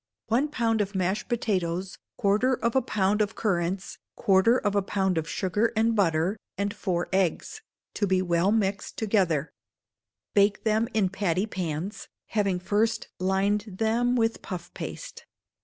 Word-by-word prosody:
One 250 +7 +2
pound 230 -6 0
of 200 0 -3
mashed 190 +5 -1
potatoes, 190 -6 -1 0.2
quarter 215 +6 +2
of 235 0 -1
a 265 - +5
pound 210 -3 +1
of 210 +1 -1
currants, 185 -2 -1 0.2
quarter 205 +3 +4
of 205 -5 0
a 200 - +3
pound 190 -1 0
of 160 - -5
sugar 205 +4 0
and 225 +1 +2
butter, 175 0 +2 0.2
and 200 +1 -1
four 180 -5 -2
eggs, 190 - 0 0.3
to 205 - 0
be 190 0 +2
well 175 +1 +2
mixed 200 -3 -1
together; 185 -9 +1 0.8
bake 200 0 +3
them 220 +1 +2
in 200 -4 +3
patty 190 -1 0
pans, 180 -1 -4 0.2
having 200 -4 +1
first 210 +5 0
lined 195 +3 +1
them 235 +3 +2
with 225 -1 +1
puff 175 -1 -7
paste. - - -7
200 Hz, 150 wpm, -27 LUFS, 185-220 Hz, 0.8 s, a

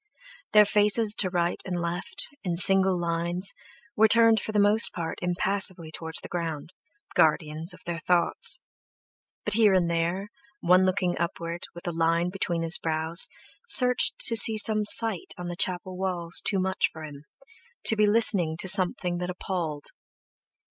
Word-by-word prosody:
Their 210 0 +6
faces 210 +1 +1
to 190 - 0
right 175 -1 -2
and 180 -2 -5
left, 170 +1 -4 0.2
in 175 -3 -4
single 190 0 +1
lines, 170 +2 -3 0.4
were 220 +1 +3
turned 230 0 +3
for - - -6
the 215 - -3
most 205 +2 +6
part 165 -2 -6
impassively 180 -1 -1
toward 160 0 -9
the - - -8
ground, 165 -2 -6 0.4
guardians 155 +2 +1
of 180 0 -10
their 170 -1 -5
thoughts; 175 +1 +3 0.9
but 210 - -1
here 210 -3 +2
and 175 -2 0
there, 170 +4 -3 0.3
one 185 +2 +2
looking 185 -1 -2
upward, 170 0 -6
with 175 - -11
a - - -2
line 165 +2 -1
between 175 -3 -4
his 165 +1 0
brows, 160 +2 +2 0.4
searched 250 - +5
to 230 - +1
see 220 0 +3
some 215 0 -1
sight 220 -3 +4
on 175 0 -7
the 175 - -7
chapel 185 +1 -2
walls 180 -2 -3
too 195 - -2
much 190 0 -2
for 160 - -12
him, 145 -1 -12 0.6
to 220 - +4
be 210 -1 +1
listening 200 -7 +4
to 190 - -5
something 180 -2 +1
that 180 0 -5
appalled. 175 -5 -6
180 Hz, 160 wpm, -25 LUFS, 170-200 Hz, 0.9 s, Their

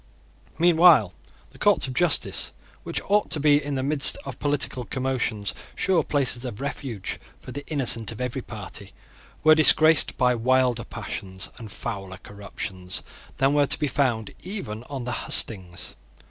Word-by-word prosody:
Meanwhile 165 - +5 0.4
the - - -18
courts - - +3
of 130 - -4
justice, 175 +2 +1 0.3
which - - -4
ought 205 +1 +1
to 155 - 0
be, 145 0 +3
in 145 -1 -3
the 130 - -2
midst 140 0 +5
of - - -8
political 145 -3 -1
commotions, 125 -5 -2 0.2
sure 185 -3 +2
places 130 -4 0
of 120 -4 -6
refuge 135 -7 -5 0.2
for - - -11
the 145 - -6
innocent 120 -7 +2
of 110 - -9
every 125 +1 -3
party, 105 -2 -9 0.5
were 155 - +7
disgraced 155 +1 +5
by 125 -1 +3
wilder 125 0 +1
passions 95 -1 -7
and 110 -3 -9
fouler 95 -3 -6
corruptions 95 -2 -6 0.3
than 135 +1 +2
were 145 -1 +3
to - - +2
be 150 - -1
found 125 -6 -1
even 180 - -6
on 135 -2 -6
the 125 - -4
hustings. 90 -5 +2
130 Hz, 155 wpm, -24 LUFS, 110-145 Hz, 0.5 s, were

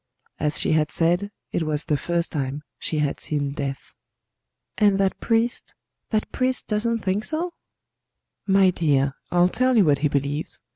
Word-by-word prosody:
As 150 0 0
she - - +1
had 155 -1 +2
said, 175 +4 +1 0.2
it - - -1
was 155 -1 -1
the 150 - +1
first 170 +4 -1
time 140 0 -3 0.2
she 155 - -3
had 150 -2 0
seen 145 -2 -1
death. 140 -1 -5 0.9
"And 205 -2 +4
that 195 -1 +1
priest 230 +1 0 0.3
that 215 -2 -1
priest 255 0 0
doesn't 230 +1 -1
think 195 +3 0
so?" 340 +6 -1 0.9
"My 195 -1 +5
dear, 140 -5 +1 0.2
I'll 175 0 +4
tell 255 +5 +2
you 205 - +6
what 145 -3 +3
he 150 - +2
believes. 140 +2 -2
170 Hz, 160 wpm, -24 LUFS, 145-210 Hz, 0.9 s, you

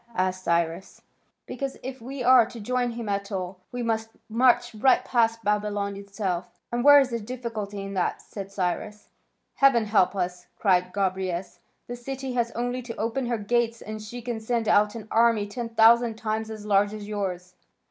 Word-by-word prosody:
asked 185 -1 -1
Cyrus. 170 +1 -1 0.4
"Because 270 +2 -5
if 260 -1 -6
we 260 +2 -5
are 245 -2 +6
to 235 - -10
join 245 +2 -1
him 230 -1 -6
at 200 0 -2
all, 185 -1 -4
we 245 -1 -3
must 225 -1 -1 0.2
march 240 +1 +3
right 240 +5 +3
past 230 -2 +1
Babylon 205 -1 -1
itself." 190 -3 -4
"And 240 0 -1
where 290 +1 +9
is 265 -2 +1
the 235 - -1
difficulty 215 -4 -5
in 195 0 -6
that?" 185 -2 0
said 195 -1 -8
Cyrus. 200 +3 -3 0.5
"Heaven 270 -5 +5
help 200 -3 +3
us!" 180 -1 -3
cried 180 -3 +2
Gobryas. 190 -2 -2 0.3
"The 245 - -6
city 265 +1 -5
has 240 -1 +1
only 245 +1 -2
to 235 -1 -7
open 235 +3 -2
her 235 -1 0
gates, 230 +2 0
and 215 0 -7
she 235 +3 -8
can 240 -2 -3
send 225 0 -1
out 210 +1 +4
an 220 -2 -8
army 230 -2 +4
ten 230 +3 -5
thousand 230 +1 +5
times 220 0 -3
as 215 -1 -8
large 205 0 +2
as 210 -1 -8
yours. 185 -4 -4
220 Hz, 180 wpm, -26 LUFS, 200-240 Hz, 0.5 s, where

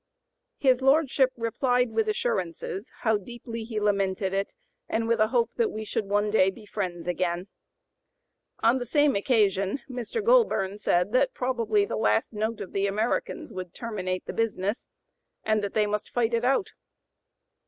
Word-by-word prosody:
His 260 -2 +3
lordship 270 -1 +4
"replied 245 +1 +1
with 220 -1 +1
assurances 195 -2 -2
how 220 -3 +3
deeply 230 +2 -7
he 220 -1 -3
lamented 195 -2 0
it, 195 - -2 0.3
and 225 0 0
with 230 0 +2
a 215 - +4
hope 235 0 +1
that 465 -2 +2
we 220 - -5
should 210 - -2
one 205 +1 +1
day 190 -3 +4
be 210 +3 -10
friends 180 -5 -4
again." 180 +1 -2 1.1
On 235 +3 +4
the 245 - -4
same 290 +2 +3
occasion 200 0 +1
Mr. 255 - -4
Goulburn 440 - +3
said 180 -1 +1
that 375 - +2
probably 230 -5 +1
the 110 - -3
last 105 - +1
note 220 +1 -2
of 185 - -7
the 195 0 0
Americans 215 +4 -2
would 185 -2 -7
"terminate 185 -6 -3
the - - -5
business," 215 -1 -1 0.6
and 215 -1 +1
that 200 - -4
they 215 -1 +3
"must 210 0 -2
fight 235 -1 0
it 230 0 +1
out." 270 +9 +1
220 Hz, 165 wpm, -27 LUFS, 195-245 Hz, 1.1 s, lordship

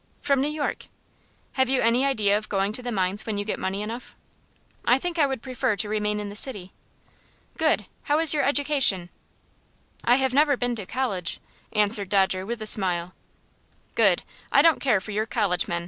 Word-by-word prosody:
"From 280 -2 +1
New 285 - +1
York." 300 -1 -3 0.6
"Have 260 -1 +1
you 265 -1 +2
any 235 +3 +3
idea 210 -7 +2
of 215 +1 -3
going 200 +1 0
to 250 - 0
the 245 0 -4
mines 195 0 -1
when 215 -2 -2
you 205 - -2
get 215 - -3
money 195 +2 -2
enough?" 230 +4 -7 0.7
"I 245 - +4
think 345 +4 -3
I 290 - +5
would 265 -4 -4
prefer 255 -3 -1
to 200 +2 -3
remain 210 0 -1
in 205 -1 -5
the 200 - -9
city." 205 -6 -2 0.8
"Good! - - +1 0.2
How 295 - +2
is 320 -1 +5
your 295 - +1
education?" 280 -11 +2 0.9
"I 240 - +5
have 265 -1 +1
never 285 0 +4
been 245 -1 -1
to 200 -4 -6
college," 200 -10 -2 0.3
answered 210 -2 +1
Dodger, 190 -1 +1
with 235 -1 -4
a - - -6
smile. 180 -4 -1 0.8
"Good! - - +3 0.3
I 280 - +5
don't 325 -2 +4
care 225 -8 +2
for 215 - -7
your 215 +2 -1
college 205 -7 +1
men. 170 - -1
220 Hz, 195 wpm, -25 LUFS, 200-265 Hz, 0.9 s, I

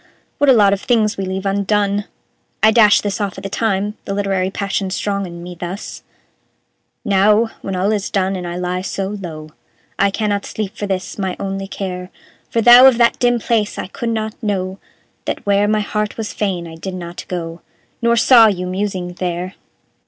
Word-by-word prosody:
What 285 - +4
a - - +8
lot 205 -4 +5
of 200 - -2
things 220 -3 +2
we 195 - -3
leave 190 +1 -4
undone! 200 +1 +1 0.6
I 220 - +7
dashed 215 -2 +5
this 205 +1 -2
off 200 -2 -3
at - - -8
the 195 - -5
time, 210 -1 -1
the 195 - -3
literary 195 -2 0
passion 200 0 -2
strong 200 +1 -2
in 170 0 -9
me, 180 0 -7
thus: 175 +3 -6 1.0
"Now, 210 +3 +3
when 195 - -4
all 190 +3 +1
is 205 -2 -1
done, 195 -1 0
and 180 -1 -5
I 175 - -4
lie 180 0 -2
so 190 0 -3
low, 165 -7 -7 0.5
I 200 - +4
cannot 205 0 -1
sleep 215 0 -4
for 205 - -4
this, 190 +1 -3
my 190 -2 -2
only 195 0 -4
care; 180 -2 -5 0.4
For 230 - +1
though 245 +3 +10
of 260 -3 +5
that 235 -1 +3
dim 245 -1 +3
place 220 -2 0
I - - -3
could 230 +5 -4
not 220 -1 -2
know; 190 -3 -2 0.5
That - - -4
where 200 0 +3
my 215 0 +2
heart 210 0 -2
was 220 -2 -4
fain 190 -5 -2
I 160 0 -10
did 185 +3 -6
not 175 -1 -7
go, 170 -2 -5 0.4
Nor 235 0 +3
saw 230 -1 +7
you 180 -3 -1
musing 185 -1 -3
there! 180 +1 -3
200 Hz, 195 wpm, -18 LUFS, 185-210 Hz, 1.0 s, though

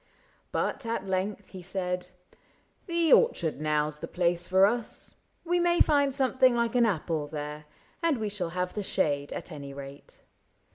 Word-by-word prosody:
— - - -35
But 275 - -1
at 225 -4 -2
length 190 +2 -2
He 185 - -9
said: 180 -1 -3 0.4
" - - -37
The 340 -2 +3
orchard 170 - +3
now 150 -1 +1
's 150 0 -8
the 165 - -5
place 175 0 0
for 190 +1 +6
us; 235 +2 -2 0.3
We 350 +1 +2
may 345 0 +3
find 285 -2 +4
something 260 -2 +3
like 235 0 +1
an 240 -2 +4
apple 160 -5 -1
there. 150 0 -6 0.4
And 330 -5 +2
we 220 -2 -2
shall 200 -4 -3
have 180 0 -1
the 210 - -3
shade, 145 -7 0
at - - -6
any 140 -2 -8
rate." 140 0 -11
190 Hz, 180 wpm, -28 LUFS, 155-245 Hz, 0.4 s, for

